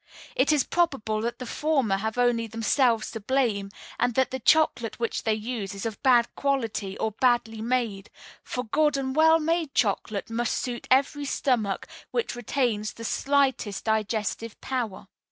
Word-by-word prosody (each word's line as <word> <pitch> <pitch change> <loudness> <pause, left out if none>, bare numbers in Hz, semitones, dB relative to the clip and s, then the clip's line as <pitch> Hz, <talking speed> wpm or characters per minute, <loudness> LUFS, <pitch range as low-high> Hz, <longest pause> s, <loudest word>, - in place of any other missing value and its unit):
It 270 +4 +3
is 295 -4 +3
probable 270 -11 0
that 235 +1 -2
the 255 - -6
former 265 -7 +1
have 220 +3 -3
only 240 -2 +2
themselves 225 +1 +1
to 225 - -5
blame, 215 -4 0 0.3
and 245 -1 +1
that 260 -1 +2
the 260 - -3
chocolate 245 -5 +2
which 230 - -1
they 220 - +3
use 215 -3 -4
is 195 - -6
of 220 -3 -4
bad 245 -3 +5
quality 225 -8 -1
or 220 - -1
badly 235 -1 +1
made; 225 -4 -1 0.3
for 250 - -4
good 295 +5 +2
and 265 -1 -2
well 320 +1 +6
made 325 -2 -1
chocolate 205 0 0
must 235 +1 0
suit 245 -2 -4
every 280 +2 +2
stomach 235 -8 0 0.2
which 470 - -2
retains 240 -3 -1
the 230 - -10
slightest 265 -7 0
digestive 220 0 -1
power. 245 -8 -3
240 Hz, 160 wpm, -26 LUFS, 220-270 Hz, 0.3 s, well